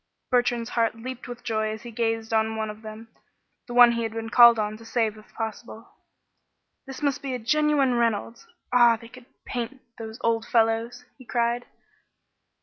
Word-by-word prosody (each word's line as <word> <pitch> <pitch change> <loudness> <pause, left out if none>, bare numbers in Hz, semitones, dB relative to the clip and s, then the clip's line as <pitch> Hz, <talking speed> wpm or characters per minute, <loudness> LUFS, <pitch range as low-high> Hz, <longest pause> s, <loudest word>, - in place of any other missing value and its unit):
Bertrand's 245 -1 +1
heart 230 -1 +1
leaped 255 +2 -8
with 245 0 -9
joy 220 -2 -1
as 215 +1 -6
he 240 - -8
gazed 225 0 -2
on 220 0 +1
one 220 -1 -3
of 210 +1 -13
them, 220 +1 -10 0.6
the 240 - -7
one 245 -1 +8
he 235 0 -2
had 225 -1 -3
been 225 0 -5
called 235 -1 +8
on 210 0 -2
to 225 - -14
save 225 -1 -1
if 215 0 -17
possible. 225 +1 -6 1.0
"This 270 +2 -8
must 285 -2 0
be 270 -2 -3
a - - -2
genuine 280 +2 +2
Reynolds. 235 - -1 0.3
Ah! 240 -2 +6
They 230 0 -13
could 255 0 -15 0.2
paint, 250 +2 -5 0.2
those 220 0 -7
old 230 -1 +1
fellows!" 225 +1 +1
he 255 - -14
cried. 240 0 -1
230 Hz, 180 wpm, -25 LUFS, 225-245 Hz, 1.0 s, one